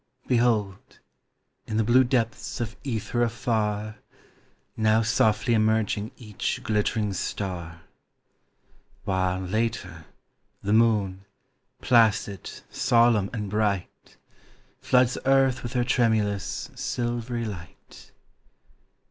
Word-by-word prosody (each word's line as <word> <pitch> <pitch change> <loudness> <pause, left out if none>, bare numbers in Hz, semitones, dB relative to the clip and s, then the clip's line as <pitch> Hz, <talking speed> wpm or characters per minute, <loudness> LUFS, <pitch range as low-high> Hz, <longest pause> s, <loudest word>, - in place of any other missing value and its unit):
Behold, 110 -5 0 0.7
in 110 - -2
the 110 - +3
blue 120 +4 +5
depths 120 -3 -1
of 115 -2 -4
ether 120 -2 -2
afar, 110 -3 -1 0.8
Now 110 0 +3
softly 110 0 +2
emerging 110 -1 +1
each 105 -5 -4
glittering 105 -1 0
star; 85 -3 -4 1.2
While, 95 -2 0
later, 95 -5 -3 0.6
the 100 - 0
moon, 105 -4 +2 0.6
placid, 110 -5 +2 0.2
solemn 115 -5 +3
and 105 -4 -4
bright, 100 -2 -2 0.6
Floods 125 -1 +2
earth 135 -1 +3
with 120 +1 -6
her 125 -1 +1
tremulous, 110 -5 0
silvery 120 -1 -3
light. 90 -6 -10
110 Hz, 90 wpm, -26 LUFS, 100-120 Hz, 1.2 s, blue